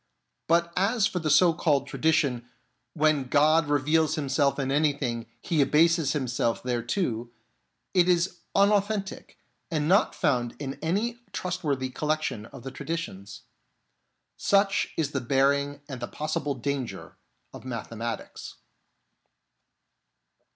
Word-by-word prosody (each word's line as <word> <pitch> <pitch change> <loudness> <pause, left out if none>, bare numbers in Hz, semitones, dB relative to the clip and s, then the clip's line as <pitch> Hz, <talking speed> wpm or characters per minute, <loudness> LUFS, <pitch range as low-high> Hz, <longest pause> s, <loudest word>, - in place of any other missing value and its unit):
But 170 +1 +2
as 205 +3 +2
for 185 -4 -1
the 160 -2 -2
so 165 +4 +5
called 150 -4 +1
tradition, 140 -5 0 0.2
" - - -47 0.2
When 155 -3 +2
God 150 +4 +3
reveals 150 +2 +2
Himself 140 -2 +1
in 135 -1 -1
anything, 140 -6 0
He 160 -4 +1
abases 155 +1 +3
Him 135 -4 -1
self 120 -1 -1
thereto," 120 - -2 0.6
it 180 -1 +4
is 175 0 +1 0.2
unauthentic, 200 0 +1 0.3
and 150 -3 -1
not 195 +5 +3
found 125 -7 0
in 135 -2 -6
any 210 +9 -1
trustworthy 145 -8 -2
collection 150 -7 -2
of 130 -2 -12
the 135 - -6
traditions. 115 - -6 1.0
Such 195 0 +2
is 150 -3 0
the 140 - -2
bearing 140 +3 +1
and 130 -4 -7
the 120 - -3
possible 150 -2 -3
danger 135 0 -4 0.4
of - - -10
mathematics. 115 -2 -6
145 Hz, 125 wpm, -27 LUFS, 130-165 Hz, 1.0 s, so